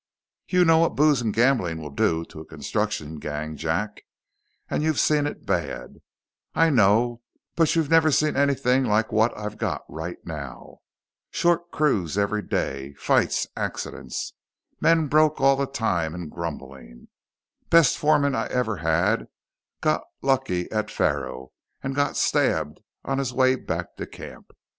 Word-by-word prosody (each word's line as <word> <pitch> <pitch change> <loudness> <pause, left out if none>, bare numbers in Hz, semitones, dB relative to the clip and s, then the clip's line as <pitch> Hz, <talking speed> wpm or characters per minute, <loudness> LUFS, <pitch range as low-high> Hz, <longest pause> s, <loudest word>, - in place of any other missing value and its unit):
"You 180 -1 +3
know 165 -1 +5
what 165 - +2
booze 150 -3 +4
and 110 -2 0
gambling 110 -8 +2
will 75 -2 -7
do 80 +4 +1
to 80 - -12
a 80 - -9
construction 75 +1 -3
gang, 75 +1 -5
Jack. 80 +8 -2 0.7
And - - -1
you've 155 -2 +1
seen 150 -1 +3
it - - -7
bad, - - -3 0.6
I 165 0 +4
know, 115 +1 +3 0.3
but 165 -1 +3
you've 160 -2 0
never 165 -1 +5
seen 150 +2 +2
anything 135 -2 +2
like 110 -1 +1
what 110 +2 +3
I've 105 0 -6
got - - -2
right 80 +2 -6
now. 70 -6 -8 0.5
Short 175 0 +1
crews 105 - 0
every 100 +1 +1
day: 70 -6 -3
fights, - - +2
accidents. - - -4 0.5
Men 165 -1 +4
broke 155 +1 +3
all 135 0 +5
the 140 0 -1
time 90 - -1
and 85 -4 -7
grumbling. 70 -7 -8 0.6
Best 165 -4 +5
foreman 145 -2 +2
I - - -1
ever 115 -5 -1
had 85 +7 +1 0.5
got - - +2 0.2
lucky 130 -10 +1
at 110 -1 -1
faro 65 -7 -2 0.3
and 135 0 -2
got 145 +1 0
stabbed 80 - +1 0.3
on 135 0 -1
his 130 -2 -2
way 130 0 +4
back 130 - -5
to - - -5
camp. - - -11
115 Hz, 150 wpm, -24 LUFS, -, 0.7 s, know